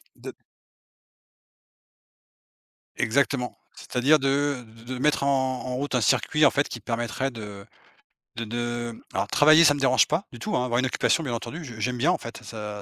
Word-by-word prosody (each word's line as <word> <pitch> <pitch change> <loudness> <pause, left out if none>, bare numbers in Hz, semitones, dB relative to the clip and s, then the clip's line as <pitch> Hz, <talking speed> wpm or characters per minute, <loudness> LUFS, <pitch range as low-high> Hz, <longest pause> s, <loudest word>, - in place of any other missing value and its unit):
de - - -9 2.6
Exactement, 125 +1 0 0.2
c'est-à-dire 140 +5 +2
de 140 -1 0
de 115 +1 -17
de - - -5
mettre 150 0 +1
en - - +1 0.3
en 125 -1 -4
route 135 0 -2
un 125 - +2
circuit, 150 +7 +3
en - - +6
fait, 145 - +1
qui 120 - -7
permettrait 120 +4 -2
de 105 -3 -9 0.7
de 115 - -3
de 120 0 -4
alors - - -1
travailler 155 +2 +6
ça 145 -2 +6
me 145 - -5
dérange 130 -1 +4
pas 160 +6 -1
du 120 - -10
tout, 110 - -2
hein, 125 - +1
avoir 120 -1 0
une 130 - +1
occupation 145 +5 +1
bien 125 -4 -3
entendu, 135 +9 -6
je 120 -6 -9
j'aime 125 +3 -1
bien, 165 +9 +3
en - - -1
fait, 115 - -8
ça 105 -2 -7
125 Hz, 185 wpm, -25 LUFS, 115-145 Hz, 2.6 s, en